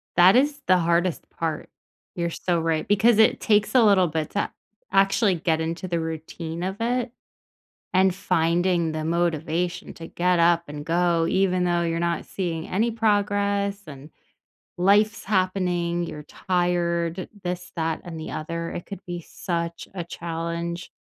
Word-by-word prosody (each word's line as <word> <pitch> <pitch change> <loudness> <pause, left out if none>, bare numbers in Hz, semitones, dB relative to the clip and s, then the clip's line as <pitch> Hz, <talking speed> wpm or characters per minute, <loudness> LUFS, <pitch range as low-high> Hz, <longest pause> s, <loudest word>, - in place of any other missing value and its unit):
That 180 +3 +7
is 285 +3 +2
the 185 - +6
hardest 170 0 0
part. 160 -2 -4 0.5
You're 170 -1 -1
so 170 +1 -1
right, 160 -1 -1
because 205 +3 +4
it 220 - +4
takes 210 +2 +2
a 250 - +7
little 195 -4 +5
bit 155 -1 -2
to 205 - -1 0.4
actually 195 +1 +3
get 160 -1 0
into 165 +3 -3
the 170 -1 -1
routine 160 +1 -5
of 190 +2 -3
it, 245 +1 -1 0.8
and 190 0 +4
finding 175 -2 +1
the 155 0 -3
motivation 170 +1 -1
to 165 - -9
get 180 0 +1
up 170 0 +4
and 145 0 -7
go 170 0 +2
even 185 -1 +2
though 175 -1 +1
you're 165 0 -1
not 170 0 -1
seeing 170 -4 -3
any 225 +5 +1
progress 205 -2 +1
and 145 0 -11 0.7
life's 205 +4 +3
happening, 180 -3 0
you're 150 -2 -7
tired, 175 0 -1
this, 180 0 -4
that, 160 -2 -1
and 165 -2 -7
the 160 - -6
other, 165 +2 -4
it 175 - -6
could 200 -2 -8
be 175 -1 -5
such 170 0 -4
a 175 - -3
challenge. 170 +1 -4
175 Hz, 155 wpm, -24 LUFS, 165-190 Hz, 0.8 s, That